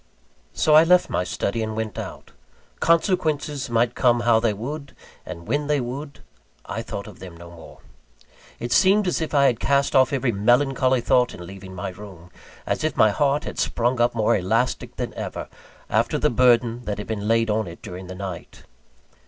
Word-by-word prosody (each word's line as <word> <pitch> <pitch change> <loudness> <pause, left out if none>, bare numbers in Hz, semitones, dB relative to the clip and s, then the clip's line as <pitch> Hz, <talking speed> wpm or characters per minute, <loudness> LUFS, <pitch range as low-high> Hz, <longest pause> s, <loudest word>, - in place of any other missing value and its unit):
So 155 - +2
I 155 +1 +8
left 180 +2 +3
my - - 0
study 100 +4 -2
and 110 0 -3
went 110 -3 -4
out. - - -8 0.5
Consequences 155 -5 +1
might 120 +1 +1
come 120 -2 +2
how 115 -1 +4
they 115 -1 +1
would, 140 +7 -6 0.3
and 85 -2 -8
when 145 0 -1
they 150 -1 +1
would; 135 +4 -6 0.4
I - - -4
thought - - -6
of - - -12
them 90 -3 -10
no 85 0 -12
more. 85 -2 -14 0.8
It 120 +1 -5
seemed 195 +6 +4
as 180 - 0
if 160 -1 -3
I 140 -1 +5
had 120 -4 +2
cast 140 0 +1
off 130 -1 +5
every 135 -3 0
melancholy 130 +4 +2
thought, 125 +1 +2
in 90 - -9
leaving 95 0 -10
my 95 +1 -4
room; 90 -2 -12 0.3
as - - -2
if 155 -3 -1
my 110 - +5
heart 145 +5 +1
had - - -6
sprung 120 +1 0
up 120 0 +2
more 110 -2 +2
elastic 110 +6 -1
than - - -4
ever, - - -6 0.4
after - - +1
the - - +1
burden 120 -1 +3
that 105 - -3
had 105 - -6
been 105 -2 -4
laid 115 0 +2
on 110 -2 -1
it 85 - -11
during 90 +1 -8
the 95 - -8
night. 95 -2 -8
120 Hz, 195 wpm, -23 LUFS, 100-140 Hz, 0.8 s, I